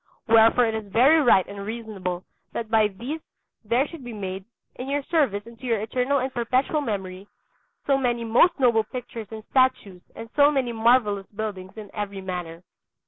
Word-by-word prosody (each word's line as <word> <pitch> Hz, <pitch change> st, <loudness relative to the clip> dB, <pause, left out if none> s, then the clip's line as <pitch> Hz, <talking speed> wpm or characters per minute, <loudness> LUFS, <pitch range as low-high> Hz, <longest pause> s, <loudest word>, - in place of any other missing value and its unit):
Wherefore 225 Hz, +2 st, +6 dB
it 225 Hz, -, -1 dB
is 215 Hz, -2 st, -5 dB
very 270 Hz, +9 st, +5 dB
right 230 Hz, -8 st, +4 dB
and 200 Hz, 0 st, -7 dB
reasonable 200 Hz, -5 st, -5 dB, 0.3 s
that 230 Hz, -1 st, -5 dB
by 220 Hz, -2 st, +4 dB
these 245 Hz, +11 st, -6 dB, 0.4 s
there 240 Hz, +6 st, +1 dB
should 330 Hz, -4 st, -11 dB
be 240 Hz, -1 st, -7 dB
made, 190 Hz, -2 st, -5 dB, 0.3 s
in 255 Hz, +2 st, -7 dB
your 285 Hz, 0 st, -1 dB
service 270 Hz, -, 0 dB
and 230 Hz, 0 st, -14 dB
to -, -, -10 dB
your 230 Hz, -3 st, +1 dB
eternal 250 Hz, +6 st, 0 dB
and 260 Hz, 0 st, -2 dB
perpetual 255 Hz, +5 st, 0 dB
memory, 195 Hz, -5 st, -5 dB, 0.6 s
so 275 Hz, -1 st, +2 dB
many 240 Hz, -2 st, 0 dB
most 240 Hz, +10 st, +3 dB
noble 235 Hz, -4 st, +4 dB
pictures 230 Hz, -1 st, -7 dB
and 220 Hz, -1 st, -8 dB
statues 255 Hz, -8 st, +1 dB
and 225 Hz, -, -8 dB
so 290 Hz, 0 st, +6 dB
many 265 Hz, -5 st, 0 dB
marvellous 225 Hz, -4 st, +2 dB
buildings 205 Hz, -2 st, -6 dB
in 210 Hz, -2 st, -9 dB
every 200 Hz, -2 st, -4 dB
manner. 180 Hz, -3 st, -6 dB
225 Hz, 180 wpm, -24 LUFS, 200-255 Hz, 0.6 s, Wherefore